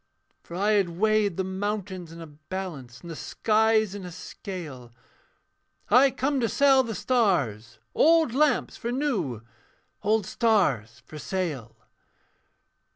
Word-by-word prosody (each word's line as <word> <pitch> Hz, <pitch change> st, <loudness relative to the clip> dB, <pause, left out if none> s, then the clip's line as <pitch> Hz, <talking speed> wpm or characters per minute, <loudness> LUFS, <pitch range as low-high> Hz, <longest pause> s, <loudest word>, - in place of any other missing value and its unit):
'For 170 Hz, -, -10 dB
I 205 Hz, +4 st, +1 dB
had 200 Hz, -4 st, +2 dB
weighed 210 Hz, +1 st, +1 dB
the 190 Hz, -, 0 dB
mountains 190 Hz, -2 st, -4 dB
in 165 Hz, 0 st, -10 dB
a -, -, -7 dB
balance, 150 Hz, -5 st, -8 dB
And 170 Hz, -, -9 dB
the -, -, -6 dB
skies 220 Hz, +2 st, +1 dB
in 205 Hz, -2 st, -7 dB
a 180 Hz, -, -7 dB
scale, 160 Hz, -9 st, -8 dB, 1.0 s
I 255 Hz, +5 st, +7 dB
come 275 Hz, +1 st, -1 dB
to 230 Hz, -3 st, 0 dB
sell 275 Hz, -2 st, +5 dB
the 230 Hz, -4 st, -4 dB
stars 140 Hz, -, 0 dB, 0.2 s
old 325 Hz, -5 st, +4 dB
lamps 300 Hz, +2 st, +2 dB
for 235 Hz, -, -4 dB
new 205 Hz, -, -2 dB, 0.6 s
Old 215 Hz, 0 st, +1 dB
stars 185 Hz, -, +1 dB
for 155 Hz, -, -10 dB
sale.' 150 Hz, -, -4 dB
190 Hz, 135 wpm, -26 LUFS, 160-225 Hz, 1.0 s, I